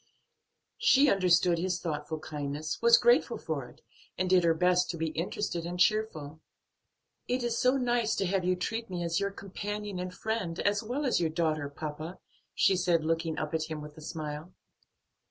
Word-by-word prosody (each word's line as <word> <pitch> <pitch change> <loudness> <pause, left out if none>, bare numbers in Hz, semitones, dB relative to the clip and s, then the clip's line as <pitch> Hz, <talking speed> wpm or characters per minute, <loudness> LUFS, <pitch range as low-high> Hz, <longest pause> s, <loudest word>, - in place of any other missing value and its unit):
She 275 +1 +5
understood 180 -2 +3
his 180 0 -1
thoughtful 155 -2 -3
kindness, 150 0 -4
was 470 0 +7
grateful 485 -1 +3
for - - -4
it, - - -20 0.4
and 185 - 0
did 180 -1 +4
her 165 -1 +3
best 180 +2 +2
to 170 - -3
be 160 0 -1
interested 170 +2 -3
and 175 +1 -5
cheerful. 160 -8 +1 0.9
"It 250 0 0
is 235 -1 -1
so 255 +2 +3
nice 240 -3 +1
to 195 - 0
have 190 0 0
you 180 +1 +2
treat 225 +5 -3
me 175 -2 -3
as 170 -1 0
your 200 - 0
companion 205 0 -5
and 180 0 -4
friend 190 -4 -3
as 205 +1 +1
well 250 +6 -3
as 260 - +2
your 165 - +1
daughter, 155 -3 -1
papa," 155 +4 -6 0.4
she 195 - +4
said, 175 -3 +1
looking 165 0 -1
up 155 0 -3
at 160 -1 0
him 155 -1 -5
with 150 0 -9
a 160 - -12
smile. 155 +1 -6
180 Hz, 185 wpm, -30 LUFS, 160-205 Hz, 0.9 s, was